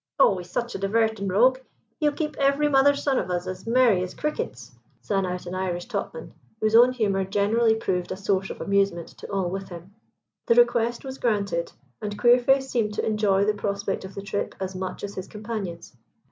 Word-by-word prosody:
"Oh, 270 Hz, -8 st, +5 dB
he's 175 Hz, 0 st, -10 dB
such 240 Hz, +5 st, -3 dB
a -, -, -4 dB
divertin' 220 Hz, 0 st, 0 dB
rogue, 245 Hz, +7 st, +4 dB, 0.4 s
he'll 300 Hz, -2 st, +3 dB
keep 300 Hz, +1 st, -3 dB
every 280 Hz, +2 st, +3 dB
mother's 280 Hz, 0 st, +4 dB
son 275 Hz, -2 st, +2 dB
of -, -, -4 dB
us 180 Hz, 0 st, -1 dB
as 185 Hz, +3 st, -7 dB
merry 235 Hz, -5 st, +4 dB
as 185 Hz, 0 st, -5 dB
crickets," 300 Hz, +11 st, -4 dB, 0.3 s
sang 195 Hz, -2 st, -1 dB
out 180 Hz, 0 st, -4 dB
an 175 Hz, -, -6 dB
Irish 185 Hz, -2 st, -2 dB
topman, 200 Hz, -8 st, -5 dB, 0.3 s
whose 215 Hz, 0 st, +1 dB
own 245 Hz, +2 st, +7 dB
humour 205 Hz, -6 st, 0 dB
generally 215 Hz, +4 st, +2 dB
proved 180 Hz, -5 st, -2 dB
a -, -, -3 dB
source 195 Hz, -1 st, 0 dB
of -, -, -7 dB
amusement 195 Hz, -4 st, 0 dB
to -, -, -11 dB
all 190 Hz, -3 st, -1 dB
with 195 Hz, 0 st, -5 dB
him. 175 Hz, +2 st, -10 dB, 0.5 s
The 235 Hz, -, +4 dB
request 240 Hz, -1 st, +3 dB
was 265 Hz, 0 st, -7 dB
granted, 200 Hz, -7 st, 0 dB, 0.3 s
and 205 Hz, -1 st, -4 dB
Queerface 250 Hz, +2 st, +4 dB
seemed 210 Hz, -4 st, 0 dB
to -, -, -1 dB
enjoy 205 Hz, -2 st, +2 dB
the 210 Hz, -, +2 dB
prospect 200 Hz, -1 st, -3 dB
of 190 Hz, 0 st, -9 dB
the 200 Hz, -, -6 dB
trip 200 Hz, 0 st, -3 dB
as 190 Hz, 0 st, -4 dB
much 185 Hz, 0 st, -5 dB
as 200 Hz, 0 st, -4 dB
his 185 Hz, -1 st, -6 dB
companions. 210 Hz, -, -6 dB
205 Hz, 200 wpm, -25 LUFS, 190-240 Hz, 0.5 s, own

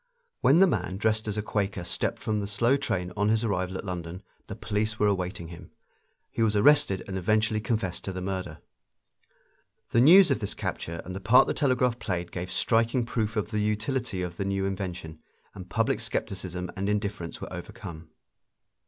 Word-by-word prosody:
When 140 Hz, -, +5 dB
the 190 Hz, -, +7 dB
man 95 Hz, -, -1 dB
dressed 110 Hz, +1 st, 0 dB
as 105 Hz, 0 st, -2 dB
a 105 Hz, -, -1 dB
Quaker 100 Hz, -4 st, -2 dB
stepped -, -, -2 dB
from 110 Hz, -2 st, 0 dB
the 100 Hz, -, -3 dB
slow 115 Hz, +5 st, +2 dB
train 90 Hz, -10 st, -2 dB
on 105 Hz, 0 st, +1 dB
his 110 Hz, +1 st, +2 dB
arrival 95 Hz, -3 st, -1 dB
at -, -, -7 dB
London 90 Hz, 0 st, -5 dB, 0.2 s
the 100 Hz, -, -6 dB
police 110 Hz, 0 st, -2 dB
were 105 Hz, -, +2 dB
awaiting 90 Hz, -4 st, -1 dB
him; 85 Hz, -, -11 dB, 0.6 s
he -, -, -3 dB
was 110 Hz, -2 st, +3 dB
arrested 130 Hz, -4 st, +4 dB
and 95 Hz, -1 st, -3 dB
eventually 110 Hz, +3 st, +2 dB
confessed 110 Hz, -6 st, -2 dB
the 95 Hz, -, -5 dB
murder. 95 Hz, -4 st, -4 dB, 1.3 s
The 115 Hz, -, +4 dB
news 175 Hz, +4 st, +8 dB
of 135 Hz, -, +1 dB
this 100 Hz, -4 st, -4 dB
capture 85 Hz, 0 st, -4 dB
and 90 Hz, -, -6 dB
the -, -, -4 dB
part 110 Hz, +6 st, +6 dB
the -, -, -1 dB
telegraph 125 Hz, -3 st, +1 dB
played 90 Hz, -4 st, -3 dB
gave 90 Hz, +1 st, -5 dB
striking 115 Hz, +1 st, +2 dB
proof 110 Hz, -2 st, -2 dB
of 105 Hz, 0 st, -2 dB
the 105 Hz, -, 0 dB
utility 105 Hz, -2 st, -1 dB
of 85 Hz, -1 st, -5 dB
the 100 Hz, -, -2 dB
new 95 Hz, 0 st, -1 dB
invention, 90 Hz, -5 st, -5 dB, 0.3 s
and -, -, -10 dB
public -, -, +1 dB
skepticism 90 Hz, -2 st, -3 dB
and 100 Hz, +2 st, -2 dB
indifference 105 Hz, -4 st, -2 dB
were -, -, -7 dB
overcome. 80 Hz, -1 st, -8 dB
105 Hz, 185 wpm, -27 LUFS, 90-110 Hz, 1.3 s, news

